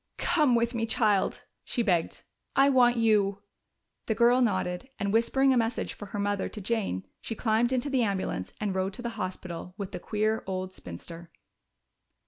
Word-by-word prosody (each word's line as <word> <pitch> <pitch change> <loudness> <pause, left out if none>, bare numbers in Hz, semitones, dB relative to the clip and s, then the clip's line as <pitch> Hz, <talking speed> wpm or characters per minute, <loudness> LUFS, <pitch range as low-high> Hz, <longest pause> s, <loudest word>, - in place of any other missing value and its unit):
"Come 300 -7 +3
with 235 +1 +1
me, 230 -1 -1
child!" 210 -4 +1 0.2
she 240 - -1
begged. 175 -6 0 0.3
"I 275 +1 +6
want 245 -2 +5
you." 205 -3 +2 0.6
The 220 - +1
girl 240 +2 +5
nodded, 190 0 0
and 200 0 -1
whispering 265 +4 +3
a - - +2
message 225 0 0
for 205 - -9
her 200 - -6
mother 205 -1 -1
to - - -8
Jane, 205 - -2 0.2
she 225 - -4
climbed 225 +2 +1
into 255 +1 0
the 265 -2 +2
ambulance 190 - -1
and 210 -3 -1
rode 190 +1 -1
to 245 - -7
the 235 - -1
hospital 180 -1 -5
with 200 -2 -5
the 180 - -5
queer 215 +3 0
old 185 0 -3
spinster. 165 - -9
215 Hz, 175 wpm, -28 LUFS, 190-235 Hz, 0.6 s, I